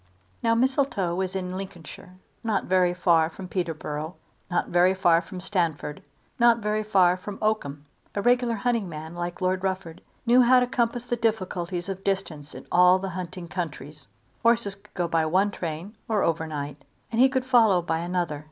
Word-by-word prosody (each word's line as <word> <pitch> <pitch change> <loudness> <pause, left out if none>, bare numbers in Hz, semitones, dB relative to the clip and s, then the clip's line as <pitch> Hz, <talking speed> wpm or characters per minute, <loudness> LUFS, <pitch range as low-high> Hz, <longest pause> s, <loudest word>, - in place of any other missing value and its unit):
Now 230 0 +2
Mistletoe 255 -7 +1
was 185 +1 -2
in 185 -1 -3
Lincolnshire, 185 -2 -9 0.3
not 220 -3 0
very 180 -1 +3
far 170 -3 +3
from 185 +3 -9
Peterborough, 160 -2 -4 0.3
not 175 - 0
very 180 +2 +4
far 170 -3 +4
from 180 +2 -9
Stamford, 170 -6 -2 0.4
not 235 -1 +6
very 210 -1 -1
far 190 -4 +4
from 195 +2 -8
Oakham. 150 -10 -1 0.3
A 200 - 0
regular 245 -1 +3
hunting 225 -2 -1
man 160 +1 -7
like 175 +1 -5
Lord 185 0 +1
Rufford 185 -3 -3 0.2
knew 245 +2 +6
how 250 +1 +6
to 250 - +2
compass 245 -1 -1
the 240 - -1
difficulties 185 -5 -2
of 195 0 -5
distance 170 -7 -3
in - - -9
all 180 +1 +6
hunting 180 -1 -6
countries. 150 -5 -6 0.3
Horses 230 -3 +2
could 200 - -21
go 175 -2 0
by 165 -1 +1
one 190 +5 +2
train 170 +4 -6
or 215 -3 +2
overnight, 150 -3 -2 0.3
and 230 +1 +2
he 265 - +7
could 260 -1 -1
follow 225 -7 +5
by 165 -1 -1
another. 175 -3 -2
185 Hz, 170 wpm, -26 LUFS, 170-215 Hz, 0.4 s, he